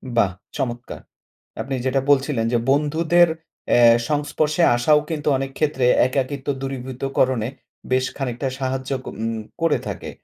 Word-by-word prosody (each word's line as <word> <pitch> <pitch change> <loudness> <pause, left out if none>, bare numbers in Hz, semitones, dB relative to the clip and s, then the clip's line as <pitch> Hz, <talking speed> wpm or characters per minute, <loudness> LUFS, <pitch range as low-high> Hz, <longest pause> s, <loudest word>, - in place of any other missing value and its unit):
বাহ, 100 -5 +3 0.3
চমৎকার! 120 -1 -4 0.6
আপনি 135 - -3
যেটা 135 +1 +1
বলছিলেন 135 -4 +2
যে - - +4
বন্ধুদের 160 +4 +3 0.4
অ্যা 120 -1 +6
সংস্পর্শে 150 +2 0
আসাও 150 +5 +4
কিন্তু 150 -2 -4
অনেক 135 0 -4
ক্ষেত্রে 145 -5 +1 0.2
একাকিত্ব 135 +1 -3
দূরীভূতকরণে 130 -2 -1 0.4
বেশ 130 0 +2
খানিকটা 135 0 -3
সাহায্য 130 0 -3
ক - - -23 0.2
উম 115 0 -1 0.3
করে 165 -2 +3
থাকে। - - -5
135 Hz, 130 wpm, -22 LUFS, 125-145 Hz, 0.6 s, অ্যা